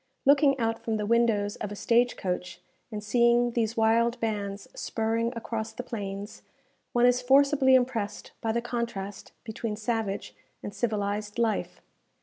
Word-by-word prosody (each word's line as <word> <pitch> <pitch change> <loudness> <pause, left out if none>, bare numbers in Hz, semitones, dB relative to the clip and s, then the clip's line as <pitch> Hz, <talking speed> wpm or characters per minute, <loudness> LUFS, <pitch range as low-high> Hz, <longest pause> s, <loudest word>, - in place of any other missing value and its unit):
Looking 280 0 +5
out 225 -2 -1
from 225 -1 -1
the 210 - -2
windows 220 -2 +2
of 210 - -5
a - - -5
stage 240 +4 +2
coach, 180 -1 -3 0.3
and 210 -1 -5
seeing 240 +2 +3
these 230 -1 -1
wild 230 +2 +3
bands 205 -3 -3
spurring 225 +1 -1
across 225 -1 -4
the 250 - -6
plains, 205 -3 -6 0.5
one 240 0 +3
is 245 0 +4
forcibly 270 +1 +5
impressed 245 -5 -1
by 225 - 0
the 235 +1 -1
contrast 230 -5 -4
between 220 -1 -4
savage 215 -2 -3 0.3
and 205 - -6
civilized 205 -1 -2
life. 230 -2 -1
225 Hz, 145 wpm, -28 LUFS, 210-240 Hz, 0.5 s, Looking